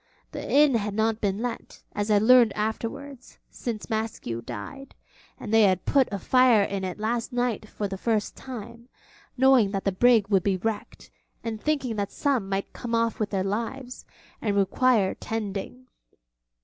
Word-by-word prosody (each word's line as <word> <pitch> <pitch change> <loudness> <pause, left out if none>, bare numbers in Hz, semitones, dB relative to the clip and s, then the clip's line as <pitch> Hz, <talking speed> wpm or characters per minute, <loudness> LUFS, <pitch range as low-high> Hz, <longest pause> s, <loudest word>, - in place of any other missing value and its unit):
The - - -6
inn 290 -1 +5
had 210 -3 -1
not 220 0 0
been 200 +2 -1
let, 245 -2 -6
as 205 +1 -2
I 210 - +5
learned 235 +1 +6
afterwards, 235 +5 -5
since 225 -4 -5
Maskew 220 - -3
died; 275 - -8 0.4
and 215 - -5
they 225 - +6
had 190 -3 +3
put 275 -3 +3
a 200 - -2
fire 245 +1 +4
in 195 -1 -3
it 185 -1 -4
last 230 +4 -2
night 245 -4 -2
for 205 - -3
the 195 -1 -6
first 220 -2 -1
time, 235 -1 -9 0.5
knowing 260 -5 +5
that 195 - -2
the 195 - +2
brig 225 +1 +4
would 195 -3 +3
be 190 +1 0
wrecked, 215 +2 -5 0.3
and 220 -2 -4
thinking 270 -7 -1
that 200 -1 -2
some 260 -9 0
might 195 0 -3
come 235 -2 -3
off 230 0 0
with 215 -2 -1
their 195 -2 -1
lives 235 +6 -4 0.4
and 205 -3 0
require 200 +1 +2
tending. 220 +3 -5
220 Hz, 170 wpm, -26 LUFS, 200-245 Hz, 0.5 s, learned